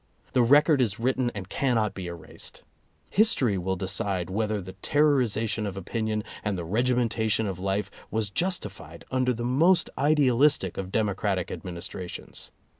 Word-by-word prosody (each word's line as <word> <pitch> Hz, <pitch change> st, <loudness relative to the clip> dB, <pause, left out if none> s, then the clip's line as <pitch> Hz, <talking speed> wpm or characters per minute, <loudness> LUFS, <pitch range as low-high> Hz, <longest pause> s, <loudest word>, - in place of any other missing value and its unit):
The 125 Hz, -, +4 dB
record 145 Hz, +4 st, +5 dB
is 110 Hz, -4 st, 0 dB
written 125 Hz, +1 st, +1 dB
and 95 Hz, -3 st, -5 dB
cannot 115 Hz, -3 st, +1 dB
be 95 Hz, -2 st, -6 dB
erased. 85 Hz, -1 st, -8 dB, 0.5 s
History 165 Hz, -, +4 dB
will 95 Hz, +2 st, -1 dB
decide 95 Hz, -1 st, -2 dB
whether 105 Hz, +1 st, 0 dB
the 95 Hz, 0 st, -8 dB
terrori 145 Hz, +5 st, +3 dB
zation 110 Hz, -1 st, -1 dB
of 100 Hz, -1 st, -5 dB
opinion, 110 Hz, +2 st, -2 dB, 0.2 s
and 105 Hz, -3 st, -1 dB
the 85 Hz, -, -4 dB
regimentation 115 Hz, +1 st, +1 dB
of 95 Hz, -3 st, -4 dB
life 95 Hz, +2 st, -1 dB, 0.2 s
was 110 Hz, -2 st, -1 dB
justified 100 Hz, -, -3 dB
under 130 Hz, -1 st, +2 dB
the 120 Hz, -1 st, -3 dB
most 165 Hz, +8 st, +3 dB
idealistic 140 Hz, -, +3 dB
of 95 Hz, -1 st, -5 dB
demo 105 Hz, -2 st, +1 dB
cratic 95 Hz, -2 st, -1 dB
administrations. 90 Hz, 0 st, -7 dB
110 Hz, 150 wpm, -27 LUFS, 95-125 Hz, 0.5 s, record